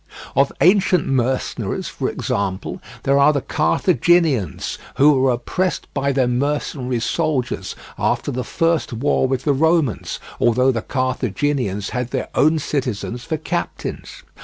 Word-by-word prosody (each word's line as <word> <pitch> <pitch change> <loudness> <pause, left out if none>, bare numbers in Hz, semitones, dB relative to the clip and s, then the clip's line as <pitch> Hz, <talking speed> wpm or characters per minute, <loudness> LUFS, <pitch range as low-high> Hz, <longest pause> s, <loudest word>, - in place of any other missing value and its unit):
Of 140 0 +3
ancient 185 -2 +4
mercenaries, 130 -1 -1
for - - -3
example, 95 -2 -3 0.2
there 140 +1 +3
are 140 +2 +6
the 140 -2 -1
Carthaginians, 160 - +1 0.2
who 145 +3 +6
were 135 -2 +3
oppressed 160 +9 -1
by 140 0 0
their 130 -2 +2
mercenary 130 -1 -1
soldiers 130 +2 -1 0.2
after - - 0
the 125 +1 -3
first 165 -3 0
war 130 +2 +1
with 130 -1 -1
the 145 - +2
Romans, 160 -3 +1 0.2
although 125 +3 +3
the 115 -3 -2
Carthaginians 130 -4 -1
had 125 +1 -2
their - - -3
own 155 +2 +3
citizens 125 -5 -3
for 160 - -2
captains. 175 - -5
135 Hz, 135 wpm, -20 LUFS, 125-150 Hz, 0.2 s, are